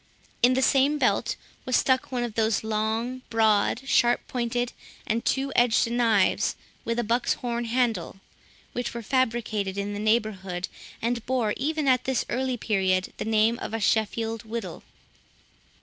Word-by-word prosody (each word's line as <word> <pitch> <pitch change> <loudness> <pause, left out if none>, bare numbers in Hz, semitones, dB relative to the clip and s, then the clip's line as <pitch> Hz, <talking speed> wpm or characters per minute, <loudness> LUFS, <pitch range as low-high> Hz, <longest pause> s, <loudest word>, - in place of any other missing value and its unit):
In 250 +1 +5
the 265 - +2
same 275 +3 +3
belt - - +1 0.3
was 255 -2 0
stuck 260 0 +2
one 245 -2 -1
of 235 -3 -4
those 220 0 +1
long, 220 +4 -1
broad, 225 +3 +2
sharp 240 -2 +3
pointed, 245 0 -2 0.3
and 230 +1 -1
two 270 +1 0
edged 235 -1 +3
knives, 230 -5 +2 0.3
with 230 0 -2
a 240 - +1
buck's 235 +3 +1
horn 240 -1 -3
handle, 230 -6 -1 0.5
which 245 -1 -3
were 235 - -5
fabricated 220 -5 0
in 200 +1 -2
the 205 - -4
neighbourhood, 205 -4 0 0.4
and 235 0 -1
bore 240 -5 +1
even 305 +2 -1
at 255 -1 +3
this 265 -1 0
early 255 0 -1
period 190 -4 0
the - - -4
name 220 +1 +2
of 225 - -4
a - - -2
Sheffield 225 +1 0
whittle. 220 -6 -6
230 Hz, 155 wpm, -26 LUFS, 215-245 Hz, 0.5 s, In